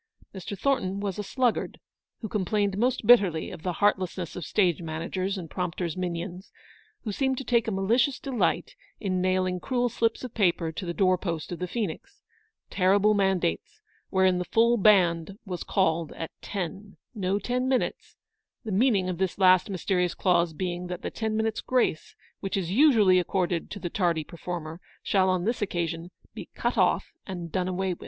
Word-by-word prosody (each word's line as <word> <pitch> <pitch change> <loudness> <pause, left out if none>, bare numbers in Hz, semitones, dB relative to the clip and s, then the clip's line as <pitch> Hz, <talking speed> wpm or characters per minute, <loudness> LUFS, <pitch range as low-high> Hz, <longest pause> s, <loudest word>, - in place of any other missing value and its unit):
Mr. 195 +1 -6
Thornton 195 -5 0
was 200 -1 -3
a - - -2
sluggard, 245 +3 -1 0.4
who 220 - -3
complained 205 0 0
most 245 +2 0
bitterly 200 -9 +5
of - - -9
the 180 +1 -2
heartlessness 185 -3 0
of 175 -5 -5
stage 180 -5 +2
managers 170 +4 -3
and 175 -3 -6
prompter's 175 -1 -3
minions, 180 +1 -5 0.5
who 215 - -3
seemed 265 +4 0
to 270 - -4
take 235 -3 +1
a - - 0
malicious 230 +8 +2
delight 260 -5 -1 0.3
in 185 -4 -1
nailing 185 0 +1
cruel 245 +3 0
slips 230 0 0
of 250 -2 -6
paper 175 -5 +1
to 180 +3 -6
the 170 - -2
door 185 -2 +3
post 170 -4 -4
of 175 - -5
the 180 - -2
Phoenix; 225 - -5 0.5
terrible 200 +3 +3
man 195 -2 +2
dates, 85 - -3 0.3
wherein 190 -1 +3
the 180 - -2
Full 235 +4 +3
Band 190 -3 +3
was 180 -3 -4
called 165 -4 0
at 165 - -6
ten; 195 +1 -5
" - - -57
no 195 -3 0
ten 250 +5 -1
minutes; 260 -2 -1 0.3
" - - -60
the 220 - -3
meaning 200 -2 +3
of 180 -2 -3
this 190 -2 -1
last 185 0 +5
mysterious 180 -2 0
clause 175 -3 +2
being 175 +2 -4
that 180 0 -6
the - - -3
ten 220 -1 -2
minutes' 220 0 -1
grace 250 -11 0 0.2
which 195 0 -3
is 180 -3 -2
usually 215 -7 +5
accorded 180 -2 -1
to - - -6
the 180 - -4
tardy 170 -5 +1
performer 170 0 -7 0.2
shall 190 -1 +2
on 185 -1 0
this 230 +1 -1
occasion 170 -3 -2 0.2
be - - -9
cut - - -1
off - - +2 0.2
anc 175 -4 -6
done 185 -1 -1
away 185 +1 -1
with. - - -12
190 Hz, 185 wpm, -27 LUFS, 175-210 Hz, 0.5 s, bitterly